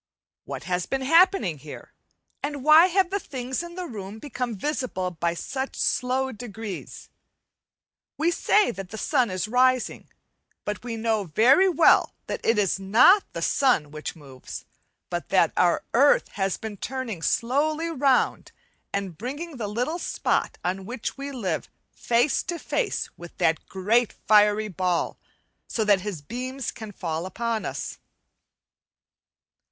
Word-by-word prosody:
What -, -, -6 dB
has 180 Hz, -1 st, -2 dB
been 270 Hz, 0 st, -1 dB
happening 330 Hz, -, +4 dB
here? 150 Hz, +1 st, -11 dB, 0.5 s
and 285 Hz, -2 st, -4 dB
why 310 Hz, +4 st, +8 dB
have 375 Hz, 0 st, +1 dB
the 400 Hz, -, 0 dB
things 260 Hz, -4 st, -4 dB
in 345 Hz, 0 st, -8 dB
the 365 Hz, -1 st, -4 dB
room 210 Hz, -, -7 dB
become 250 Hz, -2 st, -4 dB
visible 220 Hz, -6 st, -2 dB
by 170 Hz, 0 st, -1 dB
such 265 Hz, +9 st, -4 dB
slow 260 Hz, +1 st, 0 dB
degrees? 220 Hz, -3 st, -7 dB, 1.1 s
We 325 Hz, +3 st, +2 dB
say 410 Hz, -1 st, +3 dB
that 195 Hz, -3 st, -8 dB
the 220 Hz, -, -7 dB
sun 255 Hz, -1 st, +1 dB
is 185 Hz, +2 st, -2 dB
rising, 255 Hz, +2 st, +1 dB, 0.6 s
but 210 Hz, +2 st, -4 dB
we 235 Hz, -2 st, -4 dB
know 220 Hz, -2 st, 0 dB
very 255 Hz, -, +5 dB
well 335 Hz, -2 st, +4 dB
that -, -, -5 dB
it 225 Hz, -, +2 dB
is 195 Hz, -2 st, +1 dB
not 235 Hz, -, +5 dB
the -, -, -3 dB
sun 245 Hz, -, +2 dB
which 155 Hz, +3 st, -6 dB
moves, 135 Hz, -5 st, -10 dB, 0.5 s
but 175 Hz, -1 st, -3 dB
that 180 Hz, -4 st, +3 dB
our 175 Hz, -1 st, +3 dB
earth 280 Hz, +5 st, +4 dB
has 195 Hz, -2 st, -1 dB
been 220 Hz, -2 st, -7 dB
turning 240 Hz, -6 st, -4 dB
slowly 300 Hz, -, +1 dB
round, 275 Hz, -3 st, +1 dB, 0.4 s
and 190 Hz, -5 st, -4 dB
bringing 285 Hz, +6 st, -5 dB
the 220 Hz, -4 st, -3 dB
little 250 Hz, -, -2 dB
spot -, -, -1 dB
on 190 Hz, +2 st, -2 dB
which 240 Hz, -1 st, -4 dB
we 280 Hz, 0 st, -6 dB
live 195 Hz, -, -3 dB, 0.2 s
face 240 Hz, +4 st, +1 dB
to 345 Hz, -, -4 dB
face 445 Hz, +4 st, -2 dB
with 175 Hz, 0 st, -11 dB
the 160 Hz, -, +3 dB
great 215 Hz, +5 st, +1 dB
fiery 210 Hz, 0 st, +5 dB
ball, 180 Hz, -2 st, -1 dB, 0.5 s
so 225 Hz, -, -1 dB
that 205 Hz, -3 st, +4 dB
his 185 Hz, -7 st, -5 dB
beams 255 Hz, -, -4 dB
can 220 Hz, -2 st, -9 dB
fall 170 Hz, -2 st, -4 dB
upon 230 Hz, +2 st, -2 dB
us. -, -, -5 dB
230 Hz, 145 wpm, -25 LUFS, 190-275 Hz, 1.1 s, why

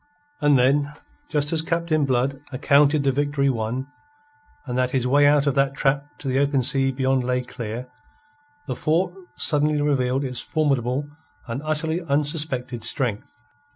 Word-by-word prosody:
And 145 Hz, -2 st, +4 dB
then, 140 Hz, +3 st, +2 dB, 0.4 s
just 150 Hz, 0 st, +1 dB
as 160 Hz, -, +2 dB
Captain 165 Hz, -2 st, 0 dB
Blood 135 Hz, +1 st, 0 dB
accounted 140 Hz, +2 st, +3 dB
the 135 Hz, -, +2 dB
victory 140 Hz, 0 st, 0 dB
won, 120 Hz, +2 st, -3 dB, 0.8 s
and 125 Hz, -3 st, -4 dB
that 125 Hz, 0 st, +1 dB
his 130 Hz, -1 st, -1 dB
way 145 Hz, +3 st, +4 dB
out 145 Hz, 0 st, +4 dB
of 140 Hz, -, +2 dB
that 135 Hz, 0 st, +1 dB
trap 140 Hz, 0 st, 0 dB
to 140 Hz, -, -8 dB
the 130 Hz, +1 st, +1 dB
open 140 Hz, -2 st, +1 dB
sea 135 Hz, 0 st, +2 dB
beyond 130 Hz, 0 st, 0 dB
lay 125 Hz, 0 st, 0 dB
clear, 120 Hz, 0 st, -6 dB, 0.8 s
the -, -, -4 dB
fort 175 Hz, +3 st, 0 dB, 0.2 s
suddenly 150 Hz, 0 st, +2 dB
revealed 135 Hz, -2 st, +1 dB
its 125 Hz, -2 st, -4 dB
formidable 140 Hz, -3 st, -1 dB, 0.4 s
and 120 Hz, +3 st, -5 dB
utterly 160 Hz, +2 st, -1 dB
unsuspected 145 Hz, -5 st, -1 dB
strength. 130 Hz, -, -1 dB
140 Hz, 155 wpm, -23 LUFS, 130-150 Hz, 0.8 s, And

